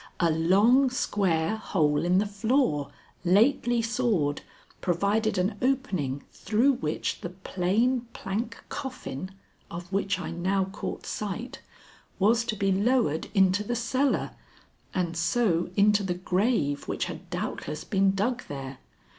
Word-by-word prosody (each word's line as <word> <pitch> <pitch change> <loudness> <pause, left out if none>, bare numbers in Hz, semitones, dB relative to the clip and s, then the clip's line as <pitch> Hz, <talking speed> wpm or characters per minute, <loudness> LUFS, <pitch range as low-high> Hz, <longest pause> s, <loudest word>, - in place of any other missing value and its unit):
A 170 -2 +3
long 205 - +4
square 200 -6 0
hole 155 -8 +1
in 180 +1 +3
the 205 - +3
floor, 205 - +1 0.3
lately 235 +5 +3
sawed, 215 - 0 0.4
provided 200 +4 +1
an 195 +3 0
opening 190 - 0
through 235 +6 +2
which 155 -10 -3
the 175 - -4
plain 195 +7 0
plank 225 +3 -4
coffin, 245 - -6 0.4
of 175 +2 -8
which 195 0 +1
I 180 - -5
now 190 +3 0
caught 195 +2 -6
sight, 215 +4 -5 0.6
was 225 +4 +3
to 225 -2 -2
be 195 -1 +1
lowered 200 - +1
into 190 +1 +4
the 240 +3 -2
cellar 255 +4 0 0.6
and 175 -2 -1
so 170 0 +1
into 205 0 +4
the 185 -3 -2
grave 180 - 0
which - - -1
had - - -8
doubtless 150 +1 -4
been 195 -1 +2
dug 240 +6 0
there. 135 -2 -7
195 Hz, 130 wpm, -27 LUFS, 175-230 Hz, 0.6 s, long